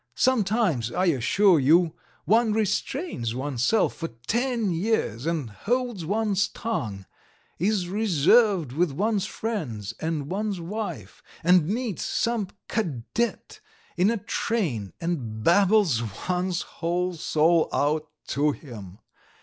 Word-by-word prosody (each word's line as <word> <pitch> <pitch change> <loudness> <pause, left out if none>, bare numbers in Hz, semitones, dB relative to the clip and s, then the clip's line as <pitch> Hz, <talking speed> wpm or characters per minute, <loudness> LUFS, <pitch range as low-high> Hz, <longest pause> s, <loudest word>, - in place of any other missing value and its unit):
Sometimes, 210 - +1
I 180 +7 +1
assure 175 - +4
you, 160 +4 +4 0.3
one 225 0 +3
restrains 215 - -1
oneself 135 - +1
for 165 - -3 0.2
ten 235 -3 0
years 165 - -1
and 155 -9 -2
holds 240 - -2
one's 205 +1 +1
tongue, 115 - -4 0.5
is 190 0 +1
reserved 195 - +3
with 165 +4 +1
one's 210 +4 0
friends 125 - -4
and 160 -3 -2
one's 200 +2 -2
wife, 170 - -6 0.2
and 175 -2 +5
meets 225 -1 -2
some 230 -4 0 0.2
cadet 215 - -2 0.4
in 185 +3 +3
a 230 - +1
train 185 - -2
and 125 -11 -3
babbles 195 - +4 0.3
one's 180 -1 0
whole 180 +2 -2
soul 160 0 +2
out 155 +1 0 0.2
to 145 +1 +2
him. 105 - -10
180 Hz, 115 wpm, -25 LUFS, 145-215 Hz, 0.5 s, and